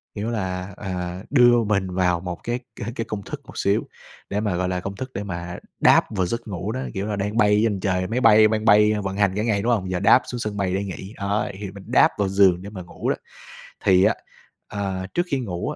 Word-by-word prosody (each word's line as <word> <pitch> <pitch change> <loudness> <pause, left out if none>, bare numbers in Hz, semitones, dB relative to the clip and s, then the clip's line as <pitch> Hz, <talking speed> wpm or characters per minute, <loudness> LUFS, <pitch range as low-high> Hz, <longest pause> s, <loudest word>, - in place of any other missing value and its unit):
kiểu 105 +2 -3
là, 95 -3 -3
ờ, 90 -1 -5
đưa 120 -3 +5
mình 100 -3 0
vào 90 -1 +1
một 90 -1 -6
cái 120 +1 -2
c 120 -1 -8
cái 115 - -3
công 105 -2 -4
thức - - -7
một - - -12
xíu 100 +2 +1 0.5
để 100 - -1
mà, 105 -4 -1
gọi 90 +1 -1
là, 90 -1 -1
công 100 +2 -5
thức 130 +2 -6
để 100 - -4
mà 90 -2 -5 0.2
đáp - - +5
vào 95 -2 +1
giấc 115 +6 -4
ngủ 100 +1 -4
đó. 130 +3 -3
Kiểu 95 +1 -3
là, 105 - -2
đang 105 +3 -2
bay 105 -2 +4
trên 105 -4 +1
trời, 95 -1 0
máy 120 +5 -1
bay 110 -2 +7
đang 110 0 -1
bay 105 -1 +6
vận 95 0 -3
hành 100 -2 +2
cả 105 - 0
ngày, 105 -3 +1
đúng 120 - +1
hông, 95 -5 0
giờ 90 - -1
đáp 105 +6 +6
xuống 125 - -5
sân 105 -3 -4
bay 95 -2 0
để 100 +1 -1
nghỉ, 95 +1 -7
đó, 100 +1 -1
thì 100 -2 -6
mình 100 -1 -11
đáp 130 +6 +5
vào 100 -2 0
giường 95 -2 +4
để 100 - -8
mà 100 -3 -8
ngủ 90 - -5
đó. - - +2 0.7
Thì 95 -1 +5
á, - - +4 0.5
ờ, 95 -2 -3
trước 175 - +1
khi 140 - +1
ngủ 90 -8 -3
á, - - -4
100 Hz, 255 wpm, -23 LUFS, 95-110 Hz, 0.7 s, bay